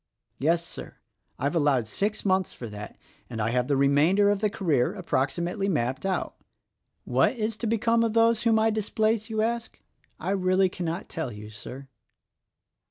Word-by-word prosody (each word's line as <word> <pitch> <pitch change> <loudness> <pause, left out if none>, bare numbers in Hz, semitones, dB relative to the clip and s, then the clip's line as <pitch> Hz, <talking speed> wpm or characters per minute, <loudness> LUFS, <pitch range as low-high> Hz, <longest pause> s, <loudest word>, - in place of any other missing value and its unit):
Yes, 165 +4 +2
Sir, - - -9 0.4
I've 140 +4 -1
allowed 145 -7 +2
six 210 - -2
months 190 -2 +1
for 120 - -7
that; 105 0 -8 0.3
and 115 -2 -5
I 110 +1 0
have 125 0 +1
the 140 -1 +2
remainder 155 +9 +4
of 205 - 0
the 210 0 +1
career 160 -10 +1
approximately 175 +3 -1
mapped 135 0 -1
out. 190 - -2 0.7
What - - +2
is 220 -1 -2
to 230 - -3
become 230 +1 +2
of 225 -2 0
those 230 0 +4
whom 230 -2 +3
I 220 0 +3
displace, 220 +1 0
you 220 -1 0
ask? 235 0 -3 0.4
I - - -2
really 185 -1 +2
cannot 175 0 -4
tell 160 -7 -4
you, 105 0 -9
Sir." 130 +5 -9
185 Hz, 165 wpm, -27 LUFS, 140-215 Hz, 0.7 s, remainder